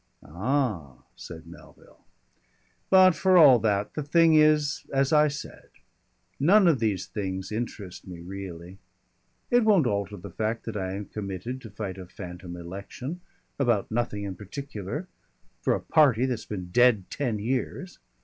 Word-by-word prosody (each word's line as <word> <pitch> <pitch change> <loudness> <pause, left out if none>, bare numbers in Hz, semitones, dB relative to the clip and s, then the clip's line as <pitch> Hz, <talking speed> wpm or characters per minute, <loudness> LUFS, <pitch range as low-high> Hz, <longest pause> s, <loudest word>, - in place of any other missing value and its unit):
"Ah!" 95 - -2
said 80 -1 -10
Melville. 85 +1 -16 0.9
"But 185 -1 +7
for 185 +2 +3
all 140 -7 +8
that, 105 -2 0
the 150 - -3
thing 165 +3 +4
is 155 -1 +3
as 135 +2 +1
I 150 0 +6
said 145 0 -8 0.7
none 185 +7 +5
of 155 -6 +3
these 105 -5 -1
things 95 -2 -5
interest 105 -5 -6
me 90 -2 -8
really. 90 0 -8 0.7
It 245 -1 +5
won't 200 -9 +4
alter 100 -2 -2
the 90 - -10
fact 110 +1 -2
that 115 - -5
I 95 -2 -3
am 100 +1 -5
committed 105 +6 -6
to 115 - -10
fight 100 -2 -6
a 90 - -9
phantom 90 -1 -9
election 100 - -7 0.4
about 120 -7 +1
nothing 110 -3 -2
in 100 -1 -4
particular, 110 - -6 0.5
for - - +2
a - - -3
party 135 -6 +3
that's 125 -4 -3
been 90 -4 -6
dead 120 -3 +4
ten 125 -7 -2
years. 130 - -3
110 Hz, 150 wpm, -26 LUFS, 95-140 Hz, 0.9 s, all